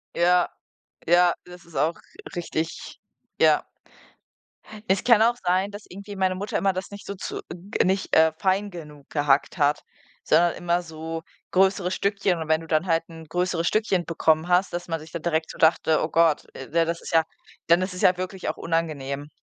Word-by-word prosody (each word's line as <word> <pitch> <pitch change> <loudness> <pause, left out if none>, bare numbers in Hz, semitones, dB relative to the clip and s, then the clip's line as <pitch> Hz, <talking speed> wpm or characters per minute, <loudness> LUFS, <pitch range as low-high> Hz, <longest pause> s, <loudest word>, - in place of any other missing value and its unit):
Ja, 175 +1 +3 0.6
ja, 175 +1 +5
das 180 -1 -13
ist 170 - -13
auch 160 +2 +1 0.4
richtig, 165 -1 -4 0.4
ja. - - +5 1.2
Es 190 0 +2
kann 235 -3 +6
auch 240 +1 +3
sein, 185 +3 +1
dass 205 0 -9
irgendwie 200 +2 -9
meine 185 -1 +1
Mutter 200 +3 -3
immer 195 -1 +2
das 185 +1 -5
nicht 200 0 -10
so 200 - -5
zu 190 - -5
ge 180 +4 -2
nicht, 190 +1 0
äh, 160 0 +6
fein 195 +2 +1
genug 150 -4 -11
gehackt 145 0 +1
hat, 145 -2 +1 0.4
sondern 175 0 +4
immer 175 0 0
so 160 0 -6 0.3
größere 190 -1 +2
Stückchen, 195 -3 0
und 160 - -5
wenn 160 0 +3
du 165 - -10
dann 155 +3 +1
halt 165 0 0
'n 165 -1 -11
größeres 175 -1 0
Stückchen 205 -5 +1
bekommen 160 0 +1
hast, 180 +2 +2
dass 175 0 -5
man 165 - -1
sich 155 +1 -13
dann 170 -2 -5
direkt 160 -2 0
so - - -14
dachte: 160 -1 +3
„Oh 155 - -1
Gott, 165 -2 +3
äh, 130 - -8
de 165 +2 +3
das 170 +1 -3
ist - - -8
ja” 165 -1 +5 0.5
dann 170 +2 +5
ist 185 0 -3
es 180 - -6
ja 180 -1 +4
wirklich 185 +1 -5
auch - - -2
unangenehm. 150 -4 -3
175 Hz, 195 wpm, -25 LUFS, 160-185 Hz, 1.2 s, kann